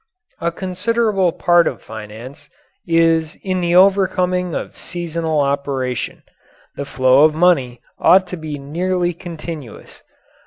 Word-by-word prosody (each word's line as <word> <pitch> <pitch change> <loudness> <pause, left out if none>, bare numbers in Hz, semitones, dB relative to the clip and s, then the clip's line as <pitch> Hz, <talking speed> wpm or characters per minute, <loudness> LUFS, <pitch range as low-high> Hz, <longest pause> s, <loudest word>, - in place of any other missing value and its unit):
A 170 0 -1
considerable 195 +1 0
part 175 +1 +3
of - - -3
finance 110 +7 -10 0.4
is 165 -1 +2
in 185 -1 -1
the 175 0 +1
overcoming 185 -2 +3
of - - -5
seasonal 165 -3 -2
operation. 140 -3 -2 0.5
The 140 - -5
flow 130 +1 +4
of 155 0 +4
money 135 -9 +2 0.2
ought 185 +1 +5
to 180 - -4
be 155 -2 -6
nearly 175 +5 -1
continuous. 165 - -9
165 Hz, 120 wpm, -19 LUFS, 140-180 Hz, 0.5 s, ought